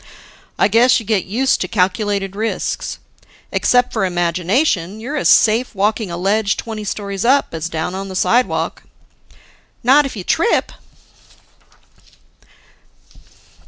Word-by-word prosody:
"I - - +4
guess 235 +4 +4
you 225 - -10
get 205 -3 0
used 250 +8 0
to - - -1
calculated 195 0 -1
risks. 220 +2 -3 0.5
Except 245 0 +2
for 220 - 0
imagination, 180 - 0
you're 260 +7 -5
as 295 - +1
safe 225 +2 +3
walking 210 +1 0
a 170 - -5
ledge 200 +2 0
twenty 220 -2 -6
stories 200 -1 -4
up, 270 +4 +3
as 165 +1 -4
down 160 +2 -3
on 195 +1 -5
the 190 - -7
sidewalk." 245 +6 0 1.0
"Not 275 +4 +5
if 260 - -9
you 195 - -6
trip." 335 - +1
210 Hz, 125 wpm, -18 LUFS, 190-235 Hz, 1.0 s, Not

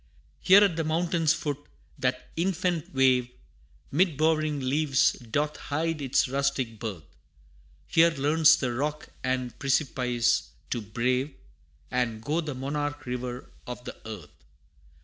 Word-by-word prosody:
Here 195 +2 +7
at 185 -5 +2
the 165 - 0
mountain's 165 0 +1
foot, 145 -3 -2 0.4
that 125 0 -1
infant 175 -1 -1
wave 130 -3 +3 0.6
'Mid 165 0 +2
bowering 155 -1 +2
leaves 140 +1 +2
doth 145 +6 -2
hide 160 +1 -2
its 135 -1 +2
rustic 135 -4 -1
birth 105 -8 -5 0.8
Here 165 +1 +5
learns 155 +1 +4
the 125 -3 -2
rock 150 +4 -3
and 130 -2 -2
precipice 125 -4 +1 0.2
to 120 - -1
brave 125 +6 -1 0.6
And 120 -3 0
go 155 +6 0
the 150 -4 -5
Monarch 145 +2 -3
River 125 0 -5 0.2
of 125 0 -6
the - - -7
Earth! 85 -10 -10
140 Hz, 130 wpm, -27 LUFS, 125-155 Hz, 0.8 s, Here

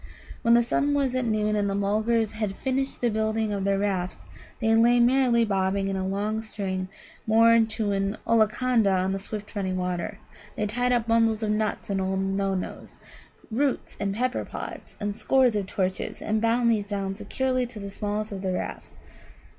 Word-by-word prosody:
When 235 +1 +5
the 240 - +5
sun 285 +4 +1
was 275 -3 +1
at 255 -1 0
noon 210 -2 +1
the 195 - -1
Mulgars 215 +2 +1
had 215 -3 -3
finished 270 +3 -2
the 240 - +2
building 220 0 0
of 195 -1 -2
their 200 0 +2
rafts. 190 -3 -2 0.3
They 225 -1 +2
lay 235 +2 +5
merrily 240 -1 +4
bobbing 195 -1 0
in 195 - -2
a 190 0 -2
long 210 +3 -1
string 190 -4 -4 0.4
moored 225 0 +5
to 210 -2 0
an 195 +1 -1
Ollaconda 230 0 +3
on 185 0 +1
the 195 - -2
swift 210 +2 -7
running 190 -2 -1
water. 180 +2 -3 0.4
They 210 - -1
tied 245 +4 0
up 240 -2 +2
bundles 225 -1 +2
of 210 - 0
nuts, 210 -1 -1
and 195 -1 0
old 190 0 -1
Nanoes, 195 -1 -2 0.5
roots, 270 +4 -1
and 200 -1 -1
pepper 250 +3 -1
pods, - - -8
and 205 -1 -2
scores 260 -4 +3
of 200 -2 -1
torches, 190 -1 -2
and 215 0 -1
bound 235 +1 +3
these 210 -3 0
down 195 -1 -3
securely 255 +5 -1
to 230 -3 -9
the 200 -1 -6
smallest 210 +1 -3
of 195 -2 -5
the 190 -1 -1
rafts. - - -5
215 Hz, 185 wpm, -26 LUFS, 195-230 Hz, 0.5 s, When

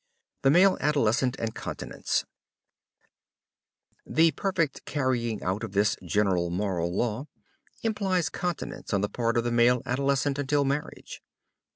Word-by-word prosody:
THE 135 - +4
MALE 185 +6 +5
ADOLESCENT 135 -3 +2
AND 110 -1 -3
CONTINENCE - - -3 1.8
The 165 +1 +3
perfect 170 -2 -1
carrying 120 -6 -1
out 95 +5 -1
of 110 - -5
this 105 +2 +2
general 95 -5 +1
moral 90 -2 -1
law 115 +8 -1 0.6
implies 195 -6 0
continence 175 -10 -4
on 100 - +1
the 105 - -1
part 115 -1 0
of 120 - +2
the 120 - -1
male 120 +1 +4
adolescent 140 +2 0
until 145 0 +1
marriage. 140 +2 -4
125 Hz, 130 wpm, -27 LUFS, 105-145 Hz, 1.8 s, MALE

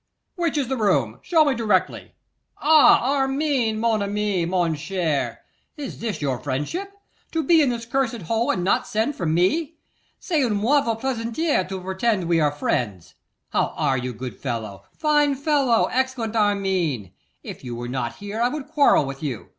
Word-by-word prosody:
'Which 340 -4 -1
is 275 -4 0
the 265 +1 -2
room? 140 - +1
Show 320 -3 +3
me 285 - +2
directly. 210 -6 0 0.4
Ah! 290 -3 +5
Armine, 270 -4 0
mon 225 -2 +1
ami! 200 -3 -1
mon 175 -2 +1
cher! 160 -2 -2 0.4
Is 285 -3 -6
this 210 -10 -4
your 130 -3 -1
friendship? 150 - -3 0.4
To 325 -1 0
be 330 -1 +5
in 280 - +3
this 235 -1 -3
cursed 235 -4 -1
hole, 225 +7 0
and 185 -2 0
not 190 - +1
send 225 +7 -1
for 175 - -3
me! 190 - +1 0.4
C'est 320 -5 0
une 235 -5 +1
mauvaise 230 +1 +1
plaisanterie 235 - -1
to 190 -1 -4
pretend 190 +2 0
we 170 -1 +3
are 150 -2 +2
friends! 110 - -2 0.4
How - - 0
are 135 - +1
you, 125 +1 -4
good 125 +2 -7
fellow, 110 -6 -5
fine 295 -2 +2
fellow, 275 -4 +2
excellent 255 -4 -1
Armine? 190 - 0 0.3
If - - -9
you 120 -1 -5
were 120 +1 -5
not 120 -2 -3
here 205 +2 -5
I 240 - +3
would 295 0 -5
quarrel 290 - +4
with 135 0 -7
you. 135 -7 -5
215 Hz, 170 wpm, -23 LUFS, -, 0.4 s, Ah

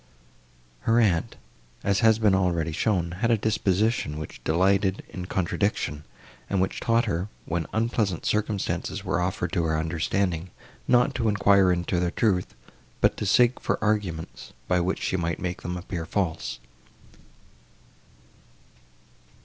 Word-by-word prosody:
Her 115 +1 +5
aunt, 95 -8 +1 0.5
as 100 -1 +2
has 110 -2 +5
been 105 -3 +3
already 85 -4 +1
shown, 85 0 0
had 115 - +2
a 115 - +4
disposition, 105 -5 0
which 75 - -8
delighted 95 +3 +2
in 90 -1 -6
contradiction, 90 -5 -1 0.4
and 100 - +1
which 95 - 0
taught 115 0 +2
her, 95 -3 -1 0.2
when 85 -1 -2
unpleasant 110 -5 0
circumstances 105 -1 -1
were - - 0
offered 90 -1 -2
to 85 -4 0
her 80 -1 +1
understanding, 85 +2 -1 0.4
not 125 -1 +4
to 115 - 0
enquire 100 -2 +4
into 90 0 0
their 90 0 +1
truth, 90 - 0 0.4
but - - +3
to 105 - -2
seek 120 +5 +4
for - - -1
arguments, 100 -7 -2
by 90 -1 +2
which 90 +2 -1
she 95 - 0
might 85 -2 -1
make 90 -1 -4
them 90 +1 -4
appear 85 -2 -5
false. 80 -10 -2
95 Hz, 140 wpm, -26 LUFS, 85-105 Hz, 0.5 s, Her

